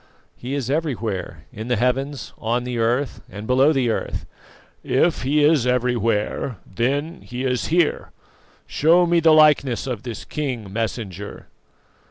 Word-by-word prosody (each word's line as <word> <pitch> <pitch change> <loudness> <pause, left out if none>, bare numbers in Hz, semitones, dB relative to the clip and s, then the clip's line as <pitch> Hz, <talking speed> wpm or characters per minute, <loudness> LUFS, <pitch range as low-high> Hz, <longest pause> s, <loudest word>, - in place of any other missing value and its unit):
"He 130 +3 -5
is 135 -2 -2
everywhere 120 - -3
in 110 +2 -6
the 125 - +1
heavens, 125 +1 -1
on 120 +2 -1
the 125 -1 -3
earth, 120 +5 0
and 105 +3 -8
below 130 +5 +4
the 130 -6 +1
earth." - - -3 0.6
"If 160 +6 +1
He 145 +3 +2
is 145 -5 +4
everywhere, 120 -2 0
then 140 - -2
He 125 +1 -6
is 125 -2 0
here. 170 -1 +1 0.6
Show 170 +4 +4
me 170 0 +3
the 165 0 +4
likeness 150 -6 +4
of 125 -6 -4
this 120 -3 -7
King, 125 -10 -4
Messenger." 105 -3 -4
125 Hz, 145 wpm, -22 LUFS, 115-145 Hz, 0.6 s, below